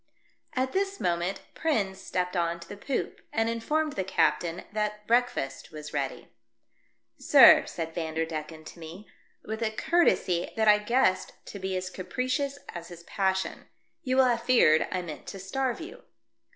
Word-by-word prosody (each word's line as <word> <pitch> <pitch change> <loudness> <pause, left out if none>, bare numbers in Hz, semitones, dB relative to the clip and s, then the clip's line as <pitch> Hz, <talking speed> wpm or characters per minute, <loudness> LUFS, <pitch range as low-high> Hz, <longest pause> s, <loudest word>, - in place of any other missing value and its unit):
At 260 0 0
this 395 +1 -1
moment 175 +2 -1
Prins 200 -12 -1
stepped 180 -1 -2
on 170 -1 0
to - - -11
the - - -8
poop, 255 +6 -3
and 225 0 +1
informed 295 +7 -1
the 190 - -2
captain 175 -2 +1
that 210 0 -2
break 245 +2 +3
fast 135 - -5
was 150 -1 -8
ready. 140 -2 -3 0.5
" - - -44
Sir," - - +8
said 165 -1 -5
Vanderdecken 160 -1 -4
to 170 - -11
me, 170 +6 -10 0.4
with 220 +1 -5
a 225 - +1
courtesy 220 - +1
that 220 -1 +1
I 210 0 +7
guessed 210 -3 +1
to 200 - -8
be 190 0 -2
as 185 0 -4
capricious 255 +9 -2
as 170 -1 -7
his 170 -1 -11
passion, 190 0 -1 0.2
" - - -47
you 255 -1 -1
will 265 - +6
have 240 -2 +2
feared 235 -11 +4
I 185 -1 -2
meant 155 -3 -8
to 195 - -7
starve 245 +6 -2
you." - - -9
195 Hz, 170 wpm, -28 LUFS, 170-240 Hz, 0.5 s, Sir